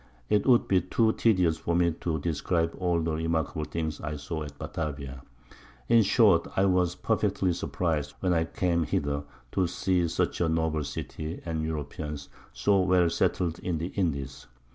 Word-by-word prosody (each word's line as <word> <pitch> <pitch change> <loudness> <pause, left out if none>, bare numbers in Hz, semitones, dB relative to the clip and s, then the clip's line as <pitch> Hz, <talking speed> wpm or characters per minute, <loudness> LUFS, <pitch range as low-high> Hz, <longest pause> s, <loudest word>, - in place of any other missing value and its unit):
It 105 +3 +2
would 120 -2 +5
be 95 -2 +3
too 110 +4 +2
tedious 90 -8 +2
for 85 - -1
me 85 0 +3
to 80 -3 -1
describe 80 +2 0
all 90 -2 +1
the 80 0 -1
remarkable 80 -1 -1
Things 80 -2 -4
I 75 0 -4
saw 75 +2 -5
at 70 -2 -7
Batavia. 70 -5 -5 0.7
In 115 -1 +6
short, 100 -5 +4
I 95 - +3
was 90 -2 +2
perfectly 100 -1 0
surpriz'd, 80 -4 -2
when 90 -2 +1
I 80 -1 +2
came 85 0 0
hither, 70 -2 -1 0.3
to 95 -2 +1
see 90 0 +1
such 80 - -1
a 85 - +2
noble 80 -1 0
City, 75 +3 -5
and 80 -2 -2
Europeans 75 -2 -5 0.2
so 70 +12 +2
well 90 -2 +3
settled 85 0 0
in 90 -3 -2
the 85 +3 -3
Indies. 70 -11 -3
85 Hz, 165 wpm, -28 LUFS, 75-90 Hz, 0.7 s, In